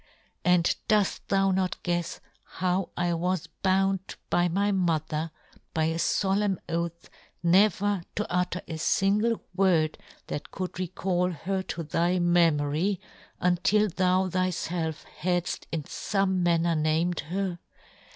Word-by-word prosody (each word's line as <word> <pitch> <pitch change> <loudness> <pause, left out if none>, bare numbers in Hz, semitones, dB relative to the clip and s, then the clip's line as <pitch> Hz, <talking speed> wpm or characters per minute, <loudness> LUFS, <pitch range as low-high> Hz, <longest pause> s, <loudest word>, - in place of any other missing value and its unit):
And 180 -1 +3
doft 210 -3 +1
thou 195 0 +3
not 185 -1 0
guefs 175 -1 -2 0.2
how 185 0 -1
I 175 0 +1
was 180 0 -1 0.2
bound" 195 0 +1 0.2
by 175 0 +3
my 200 +4 +1
mother, 160 -4 0 0.5
by 160 - +2
a 165 +1 0
folemn 195 +1 +1
oath, 170 0 -3 0.4
never 200 +2 +3
to 210 - -1
utter 180 0 -1
a 160 -1 -5 0.2
lingle 210 +4 +2
word 175 -5 +2 0.3
that 145 - -5
could 185 -1 -5
recall 180 0 0
her 190 +3 -2
to 175 -2 -5
thy 170 +4 +1
me 175 -1 +5
mory, 155 +6 0 0.4
until 190 +4 +3
thou 185 +1 +2
thyfelf 175 -3 -2
hadft 175 +1 -1
in 160 -2 -2
fome 195 +4 0
manner 170 -1 +2
named 160 +2 +1
her 180 +2 -3
180 Hz, 130 wpm, -27 LUFS, 170-190 Hz, 0.5 s, me